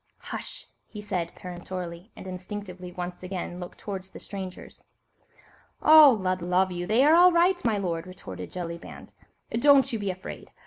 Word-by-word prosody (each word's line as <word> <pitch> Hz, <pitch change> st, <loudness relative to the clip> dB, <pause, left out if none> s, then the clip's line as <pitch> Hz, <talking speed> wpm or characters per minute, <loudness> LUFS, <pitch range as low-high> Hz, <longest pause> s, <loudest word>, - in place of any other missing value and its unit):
"Hush!" -, -, -7 dB, 0.2 s
he 210 Hz, -, -9 dB
said 195 Hz, -5 st, -3 dB
peremptorily, 180 Hz, +1 st, -7 dB
and -, -, -10 dB
instinctively 185 Hz, -1 st, -7 dB
once 180 Hz, 0 st, -6 dB
again 180 Hz, -1 st, -5 dB
looked 180 Hz, -1 st, -8 dB
towards 190 Hz, -2 st, -6 dB
the -, -, -11 dB
strangers. 190 Hz, -2 st, -8 dB, 0.9 s
"Oh! 300 Hz, -5 st, +8 dB
Lud 185 Hz, -1 st, -1 dB
love 180 Hz, +2 st, +2 dB
you, 175 Hz, 0 st, -4 dB
they 225 Hz, +6 st, +4 dB
are 305 Hz, -, +6 dB
all 355 Hz, +2 st, +8 dB
right, 350 Hz, +2 st, +3 dB
my 225 Hz, -3 st, +2 dB
lord," 175 Hz, -3 st, -2 dB
retorted 95 Hz, -, -8 dB
Jellyband; 170 Hz, -1 st, -7 dB, 0.4 s
"don't 270 Hz, +2 st, +5 dB
you 225 Hz, -, -1 dB
be 200 Hz, -1 st, -2 dB
afraid. 185 Hz, 0 st, -7 dB
185 Hz, 160 wpm, -27 LUFS, 180-215 Hz, 0.9 s, Oh